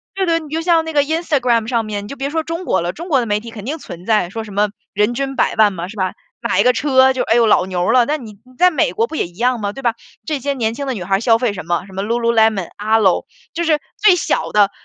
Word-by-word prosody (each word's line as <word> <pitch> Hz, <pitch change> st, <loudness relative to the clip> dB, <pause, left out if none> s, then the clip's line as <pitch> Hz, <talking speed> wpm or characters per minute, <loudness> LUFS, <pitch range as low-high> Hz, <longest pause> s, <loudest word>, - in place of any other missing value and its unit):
对， 385 Hz, -1 st, 0 dB
对， 335 Hz, -1 st, +2 dB
你 310 Hz, -, -11 dB
就 315 Hz, +2 st, -2 dB
像 330 Hz, -1 st, +3 dB
那 320 Hz, -, -4 dB
个 290 Hz, -, +4 dB
Instagram 280 Hz, -8 st, 0 dB
上 230 Hz, -2 st, 0 dB
面， 205 Hz, -1 st, -4 dB
你 -, -, -9 dB
就 -, -, -6 dB
别 275 Hz, +1 st, -2 dB
说 320 Hz, +2 st, -1 dB
中 335 Hz, +3 st, -5 dB
国 -, -, +1 dB
了， 175 Hz, +1 st, -2 dB
中 340 Hz, +3 st, -8 dB
国 280 Hz, -5 st, +3 dB
的 -, -, -2 dB
媒 210 Hz, -1 st, 0 dB
体 230 Hz, +2 st, -10 dB
肯 210 Hz, -3 st, -9 dB
定 295 Hz, +6 st, -3 dB
存 175 Hz, -, -10 dB
在， 210 Hz, -5 st, +2 dB
说 225 Hz, +4 st, -5 dB
什 215 Hz, -, -11 dB
么 205 Hz, +1 st, +1 dB, 0.2 s
人 210 Hz, +3 st, +1 dB
均 270 Hz, +2 st, -3 dB
百 -, -, +1 dB
万 215 Hz, -2 st, +5 dB
嘛， 175 Hz, -1 st, -5 dB
是 205 Hz, -, -10 dB
吧， 185 Hz, -1 st, 0 dB, 0.3 s
买 235 Hz, -, 0 dB
一 -, -, +5 dB
个 250 Hz, -, +4 dB
车 260 Hz, +1 st, +4 dB
就 260 Hz, -, -1 dB
哎 225 Hz, -, +1 dB
呦 235 Hz, -1 st, +4 dB
老 205 Hz, -4 st, +4 dB
牛 180 Hz, +2 st, 0 dB
了。 250 Hz, 0 st, +5 dB
那 300 Hz, +4 st, -1 dB
你 230 Hz, -7 st, -10 dB
你 255 Hz, -, -19 dB
在 360 Hz, -, +6 dB
美 275 Hz, -, +1 dB
国 225 Hz, +4 st, 0 dB
不 320 Hz, -, -7 dB
也 290 Hz, -, -1 dB
一 170 Hz, -, -20 dB
样 245 Hz, 0 st, +1 dB
嘛， 200 Hz, -1 st, -2 dB
对 270 Hz, -, -8 dB
吧， 235 Hz, -1 st, +1 dB, 0.3 s
这 305 Hz, -3 st, -2 dB
些 280 Hz, +2 st, -1 dB
年 225 Hz, -3 st, -1 dB
轻 280 Hz, +4 st, -5 dB
的 265 Hz, -, -1 dB
女 200 Hz, -7 st, -5 dB
孩 195 Hz, +1 st, +1 dB
消 230 Hz, -1 st, +4 dB
费 230 Hz, -3 st, 0 dB
什 185 Hz, -, -7 dB
么， 175 Hz, +1 st, -1 dB
什 195 Hz, -, -15 dB
么 195 Hz, +1 st, -3 dB
Lululemon、 225 Hz, -4 st, +1 dB
Alo。 215 Hz, -3 st, +3 dB, 0.3 s
就 340 Hz, -, -2 dB
是 315 Hz, -3 st, +2 dB, 0.2 s
最 415 Hz, -4 st, +5 dB
小 -, -, -1 dB
的， 205 Hz, -1 st, +4 dB
235 Hz, 390 characters per minute, -18 LUFS, 210-285 Hz, 0.3 s, 在